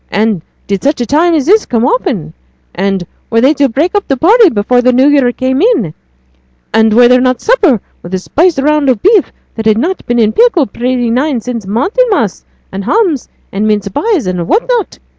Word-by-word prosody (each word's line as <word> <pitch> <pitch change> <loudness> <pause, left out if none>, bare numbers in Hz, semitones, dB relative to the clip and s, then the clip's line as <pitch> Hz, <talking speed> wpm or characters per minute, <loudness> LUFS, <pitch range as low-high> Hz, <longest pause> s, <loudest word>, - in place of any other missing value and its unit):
and 210 -3 -1 0.2
did 200 -1 -3
such 285 +1 0
a 240 - -1
time 325 +7 +2
as 290 -4 0
this 420 +6 +2
come 235 -1 0
often? 235 - -2 0.4
And 195 0 -2 0.2
were 230 - +1
they 270 +5 +4
to 285 -2 +1
break 300 +10 -1
up 410 -1 -1
the 275 - -1
party 415 - +4
before 245 0 +1
the 255 +1 +2
New 260 +3 +3
Year 280 -4 +3
came 260 +3 -2
in? 375 - +1 0.8
And 220 0 +3
was 240 +3 +5
there 250 0 +4
not 255 -1 0
supper, 390 - +2 0.2
with 175 - -11
a - - 0
spiced 320 - 0
round 295 0 +1
of 245 -5 0
beef 405 -3 +3 0.2
that 225 -1 -4
had 220 0 +2 0.3
been 240 - 0
in 220 -2 +2
pickle 460 - +3
pretty 245 +1 -2
nigh 265 +3 0
sin' 235 0 -5
Martinmas, 325 - -1 0.3
and 195 +1 -5
hams, 340 - 0 0.2
and 205 +2 -2
mince 210 -1 -1
pies, 305 - -1
and 180 -2 -3
what 460 - 0
not? 480 -5 -2
255 Hz, 200 wpm, -11 LUFS, 220-330 Hz, 0.8 s, was